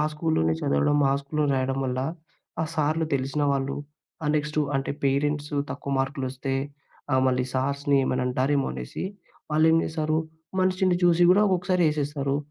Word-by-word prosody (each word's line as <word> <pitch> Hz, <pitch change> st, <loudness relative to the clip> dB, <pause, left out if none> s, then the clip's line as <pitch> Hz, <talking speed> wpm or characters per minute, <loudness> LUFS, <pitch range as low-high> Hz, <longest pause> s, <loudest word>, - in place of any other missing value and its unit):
స్కూల్లోనే 150 Hz, -, +1 dB
చదవడం, 70 Hz, -, +2 dB
ఆ -, -, +3 dB
స్కూల్‌లో 150 Hz, +2 st, -1 dB
రాయడం 130 Hz, 0 st, 0 dB
వల్ల, 130 Hz, 0 st, -1 dB, 0.6 s
ఆ -, -, +1 dB
సార్‌లు 155 Hz, +1 st, +1 dB
తెలిసిన 135 Hz, +2 st, -1 dB
వాళ్ళు, 135 Hz, 0 st, -1 dB, 0.5 s
ఆ -, -, -1 dB
నెక్స్టు 150 Hz, +1 st, -1 dB, 0.2 s
అంటే, 135 Hz, -, -2 dB
పేరెంట్సు 145 Hz, +2 st, 0 dB
తక్కువ 140 Hz, 0 st, -4 dB
మార్కులు 135 Hz, 0 st, -1 dB
వస్తే, 135 Hz, +1 st, -3 dB, 0.6 s
ఆహ్, 130 Hz, -, +3 dB
మళ్ళీ 125 Hz, -1 st, +2 dB
సార్స్‌ని 140 Hz, +2 st, +1 dB
ఏమైనా 125 Hz, -1 st, 0 dB
అంటారేమో 135 Hz, +2 st, +1 dB
అనేసి, 60 Hz, -, -6 dB, 0.5 s
వాళ్ళేం 160 Hz, +1 st, +5 dB
చేశారు, 155 Hz, -1 st, -1 dB, 0.4 s
మనిషిని 185 Hz, -1 st, +2 dB
చూసి 175 Hz, 0 st, +4 dB
గూడా 205 Hz, +3 st, +5 dB
ఒక్కొక్కసారి 180 Hz, -1 st, +1 dB
ఏసేస్తారు. 145 Hz, -2 st, -1 dB
145 Hz, 145 wpm, -26 LUFS, 135-155 Hz, 0.6 s, వాళ్ళేం